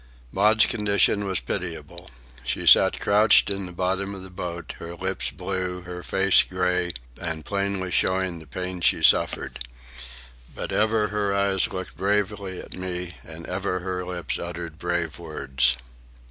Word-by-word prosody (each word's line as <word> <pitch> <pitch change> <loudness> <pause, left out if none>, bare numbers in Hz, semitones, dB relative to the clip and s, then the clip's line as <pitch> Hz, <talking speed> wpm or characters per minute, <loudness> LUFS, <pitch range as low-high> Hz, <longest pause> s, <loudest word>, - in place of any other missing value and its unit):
Maud's 105 +3 +4
condition 105 -2 +2
was 95 -2 0
pitiable. - - -6 0.3
She - - -2
sat - - +7
crouched 105 0 +5
in 100 -1 -2
the - - -9
bottom 95 +3 -1
of 95 - -8
the 95 - -11
boat, 85 -3 -6
her 85 0 -7
lips 95 +2 -1
blue, 90 -1 -3
her 90 0 -7
face 95 +1 +4
grey 90 -1 0 0.3
and 80 -2 -4
plainly 100 -2 -2
showing 95 -2 +1
the 80 - -13
pain 90 +3 -5
she 65 -6 +2
suffered. - - +3 1.0
But - - -5
ever 110 0 +2
her 105 -1 0
eyes 100 +2 +2
looked 95 -1 -6
bravely 100 -1 -1
at - - -8
me, 90 -1 -5
and 80 +1 -10
ever 95 0 -2
her 90 0 -3
lips 90 -3 -3
uttered 85 -1 -6
brave 85 -4 -2
words. 70 -6 +1
95 Hz, 150 wpm, -25 LUFS, 85-100 Hz, 1.0 s, sat